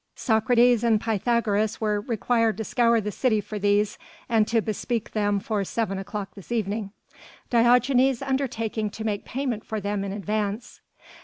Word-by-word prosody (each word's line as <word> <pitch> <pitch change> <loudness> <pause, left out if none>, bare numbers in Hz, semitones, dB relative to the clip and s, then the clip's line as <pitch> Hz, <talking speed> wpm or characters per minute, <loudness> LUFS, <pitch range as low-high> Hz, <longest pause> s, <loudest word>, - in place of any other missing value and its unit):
Socrates 240 +1 +3
and 225 -2 +3
Pythagoras 220 -1 0
were 210 -2 0
required 230 0 0
to 220 - -3
scour 235 0 +2
the 210 -1 -3
city 220 +1 +1
for 210 +1 -6
these, 205 +1 +1 0.3
and 220 -2 +2
to 230 0 +2
bespeak 220 +1 -3
them 205 -1 +1
for 210 0 -2
seven 195 -1 -2
o'clock 200 +1 -6
this 200 +2 -13
evening, 210 -2 -2 0.6
Diogenes 250 +2 +4
undertaking 230 -5 -2
to 220 - -7
make 205 -2 -2
payment 250 -5 -3
for 220 - -4
them 200 0 -2
in 200 - -4
advance. 210 +2 -3
220 Hz, 155 wpm, -25 LUFS, 205-235 Hz, 0.6 s, Diogenes